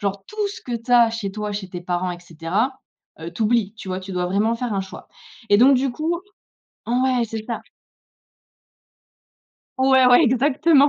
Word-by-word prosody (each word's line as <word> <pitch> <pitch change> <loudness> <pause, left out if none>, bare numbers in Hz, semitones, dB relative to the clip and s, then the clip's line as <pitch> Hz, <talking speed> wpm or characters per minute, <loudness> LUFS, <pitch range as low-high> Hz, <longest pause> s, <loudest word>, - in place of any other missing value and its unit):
Genre 200 -1 -3
tout 425 -1 -3
ce 400 - -9
que 245 - -4
tu 230 +2 -10
as 240 -2 +6
chez 225 -3 -4
toi 210 +1 -4
chez 200 -2 -5
tes 175 -1 -7
parents 180 +1 -2
et 175 - -6
cetera. 175 - -2 0.4
Heu, 165 +1 -6
tu 170 +6 -4
oublies 220 -2 +1
tu 215 -3 -10
vois? 185 0 -3
Tu 190 +1 -8
dois 180 -1 -1
vraiment 205 +5 +1
faire 235 -1 -3
un 195 - 0
choix. 190 +1 -9 0.4
Et 205 - +6
donc 265 +3 +6
du 265 +1 0
coup 320 +6 -2 0.7
ouais, 250 0 +2
c'est 220 -1 -6
ça! 230 -1 -4 2.2
Ouais, 260 -1 +5
ouais, 250 +4 +7
exactement. 280 +3 +4
225 Hz, 190 wpm, -22 LUFS, 195-260 Hz, 2.2 s, ouais